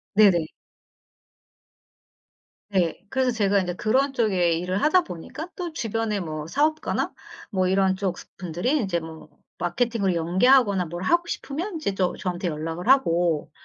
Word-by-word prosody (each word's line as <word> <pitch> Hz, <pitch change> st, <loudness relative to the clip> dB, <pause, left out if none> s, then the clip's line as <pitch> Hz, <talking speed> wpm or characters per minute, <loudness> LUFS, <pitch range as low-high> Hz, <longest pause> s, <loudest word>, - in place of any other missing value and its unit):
네네. 195 Hz, -6 st, +5 dB, 2.2 s
네. 180 Hz, -5 st, 0 dB
그래서 260 Hz, 0 st, +1 dB
제가 205 Hz, -3 st, +2 dB
인제 180 Hz, -2 st, -2 dB
그런 265 Hz, +8 st, +1 dB
쪽에 190 Hz, -8 st, +2 dB
일을 180 Hz, +4 st, -1 dB
하다 355 Hz, +4 st, +4 dB
보니까 295 Hz, -, -7 dB
또 350 Hz, -3 st, -4 dB
주변에 225 Hz, -5 st, -2 dB
뭐 155 Hz, -4 st, -5 dB
사업가나 305 Hz, -, 0 dB, 0.4 s
뭐 185 Hz, -3 st, +1 dB
이런 190 Hz, 0 st, +2 dB
쪽 190 Hz, -2 st, -2 dB
스 -, -, -11 dB
분들이 180 Hz, +6 st, -2 dB
인제 200 Hz, -, +1 dB
뭐 160 Hz, -1 st, -10 dB, 0.3 s
마케팅을 200 Hz, +1 st, 0 dB
연계하거나 190 Hz, +4 st, +3 dB
뭘 175 Hz, +2 st, -6 dB
하고 345 Hz, -, +2 dB
싶으면 340 Hz, +6 st, -4 dB
이제 310 Hz, -10 st, -1 dB
또 185 Hz, -2 st, -1 dB
저한테 180 Hz, 0 st, -3 dB
연락을 165 Hz, +3 st, -4 dB
하고 175 Hz, -, +3 dB
190 Hz, 295 characters per minute, -24 LUFS, 175-250 Hz, 2.2 s, 네네